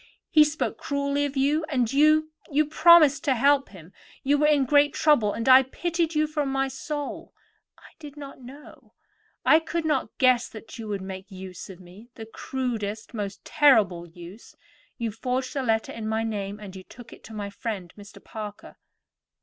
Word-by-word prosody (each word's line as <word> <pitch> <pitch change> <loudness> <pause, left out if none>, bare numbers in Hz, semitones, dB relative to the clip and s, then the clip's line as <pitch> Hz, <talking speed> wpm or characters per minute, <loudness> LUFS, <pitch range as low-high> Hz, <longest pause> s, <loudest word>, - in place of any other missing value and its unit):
He 305 -2 +7
spoke 300 +2 -2
cruelly 280 0 -1
to 270 0 -4
you; 295 +4 +1
and 250 -4 0
you—you 305 0 +2
promised 310 -2 +5
to 270 - +2
help 275 +3 +3
him. 185 -2 -14 0.3
You 285 +1 +2
were 300 - +3
in 290 -3 +3
great 290 +1 +3
trouble, 265 -10 +3
and 230 +3 -4
I 260 0 +9
pitied 330 +4 -2
you 305 0 +3
from 300 -2 -2
my 270 0 +1
very 270 - -3
soul. 290 +2 -6 0.4
I - - -18
did 295 -2 -11
not 275 -2 -10
know; 270 +4 -14 0.5
I 315 - +6
could 325 0 -4
not 310 - -1
guess 255 -2 +3
that 225 +2 -11
you 225 - -6
would 200 -2 -4
make 190 +1 -8
use 185 -2 -9
of 190 -2 -11
me; 190 +6 -15
the 225 - -8
crudest, 225 -3 -5
the 235 - -9
most 200 -1 -6
terrible 205 - +3
use. 175 +5 -13 0.4
You 230 -3 -3
forged 255 +5 -3
a 275 - 0
letter 225 -3 0
in 220 -1 -6
my 220 +1 -1
name, 205 -2 -4
and 195 -3 -10
you 190 - -8
took 240 +5 -14
it - - -16
to 220 - -11
my 205 -1 -5
friend, 200 -5 -6
Mr. 205 0 -14
Parker." 210 -2 -9
255 Hz, 190 wpm, -25 LUFS, 210-290 Hz, 0.5 s, I